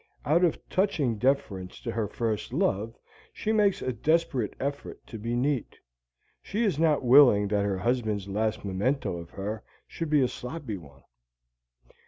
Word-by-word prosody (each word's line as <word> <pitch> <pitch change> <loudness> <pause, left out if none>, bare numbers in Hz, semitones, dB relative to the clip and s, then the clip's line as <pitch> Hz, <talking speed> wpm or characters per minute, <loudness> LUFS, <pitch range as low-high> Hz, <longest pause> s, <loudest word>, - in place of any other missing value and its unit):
Out 160 +7 +3
of 170 - +3
touching 145 - 0
deference 100 -8 -1
to 115 - -3
her 110 -2 -1
first 110 0 -3
love 110 +4 0 0.3
she 220 - -2
makes 210 -3 +2
a 130 - -1
desperate 150 - 0
effort 140 +1 -4
to 110 - -8
be 115 +3 -2
neat; 130 0 -1 0.6
she 215 +4 -2
is 190 -9 +1
not 155 -5 +2
willing 120 -6 +7
that 100 -1 +1
her 100 -2 0
husband's 110 -1 -1
last 110 +2 -1
memento 100 +4 -1
of 85 0 -9
her 105 +4 -5 0.2
should 165 -2 -5
be 150 -2 +4
a - - +3
sloppy 125 -4 -6
one. 70 -5 -15
120 Hz, 160 wpm, -28 LUFS, 105-145 Hz, 0.6 s, willing